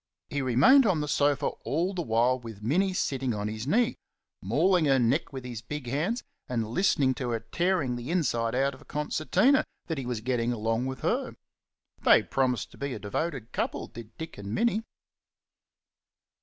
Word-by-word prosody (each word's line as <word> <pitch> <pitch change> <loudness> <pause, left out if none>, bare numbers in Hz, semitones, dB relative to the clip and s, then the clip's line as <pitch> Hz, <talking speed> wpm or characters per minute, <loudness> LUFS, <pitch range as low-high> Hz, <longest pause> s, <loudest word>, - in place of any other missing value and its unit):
He 145 - -1
remained 140 - +6
on 180 -5 +2
the 150 - -2
sofa 145 -1 +2 0.2
all 170 +7 0
the 180 - -2
while 120 -1 +2
with 110 -4 -10
Minnie 185 - +2
sitting 135 -9 -1
on 105 0 -2
his 110 +3 -5
knee, 235 +8 +2 0.4
mauling 180 -3 +3
her 135 -2 +4
neck 125 +6 +1
with 130 -2 -7
his 120 -3 -6
big 145 +4 -6
hands 160 - -1 0.3
and 115 -3 -1
listening 135 - +2
to 125 -1 -4
her 115 -1 -1
tearing 170 0 0
the 120 +3 -6
inside 120 -10 0
out 135 +2 +1
of 130 - -14
a - - -16
concertina 155 - +2 0.2
that 160 -4 -3
he 130 - -5
was 120 -3 -3
getting 120 0 0
along 115 +2 -1
with 130 0 -5
her. - - -1 0.7
They - - +6
promised 130 -2 0
to - - -16
be 140 -2 -3
a - - -6
devoted 120 +4 -3
couple, - - -2
did 115 -1 -12
Dick 160 -9 -7
and 100 +1 -4
Minnie. 230 -2 +2
130 Hz, 185 wpm, -28 LUFS, 115-160 Hz, 0.7 s, remained